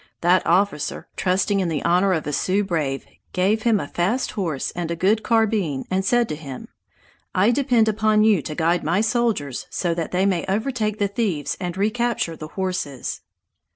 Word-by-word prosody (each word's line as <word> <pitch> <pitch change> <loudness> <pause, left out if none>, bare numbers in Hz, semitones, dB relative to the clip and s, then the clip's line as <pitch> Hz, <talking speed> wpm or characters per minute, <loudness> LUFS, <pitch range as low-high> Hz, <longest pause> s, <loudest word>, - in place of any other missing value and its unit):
That 180 +2 +4
officer, 175 -4 +1
trusting 195 +2 +1
in 185 -3 0
the 155 -3 -2
honor 180 +3 +3
of 160 - -1
a 150 - -3
Sioux 195 +7 +1
brave, 155 -8 -2 0.3
gave 200 +4 +2
him 225 -2 +3
a - - -4
fast 210 +10 -1
horse 165 -9 -2
and 175 -1 -4
a 170 - -1
good 200 +6 +2
carbine, 215 - +1
and 190 +1 +1
said 240 +4 +2
to - - -2
him: 140 -4 -9 0.7
"I 200 +5 +4
depend 245 -4 +2
upon 215 0 +3
you 215 -6 +4
to 150 - -6
guide 170 +3 +1
my 175 +6 +1
soldiers 220 - 0
so 175 -2 -1
that 165 -1 -3
they 185 +2 +1
may 185 -4 +1
overtake 215 0 -1
the 205 - +1
thieves 195 - -1
and 180 -1 -4
recapture 215 -4 0
the 155 - -8
horses!" 180 -7 -3
190 Hz, 185 wpm, -22 LUFS, 165-215 Hz, 0.7 s, That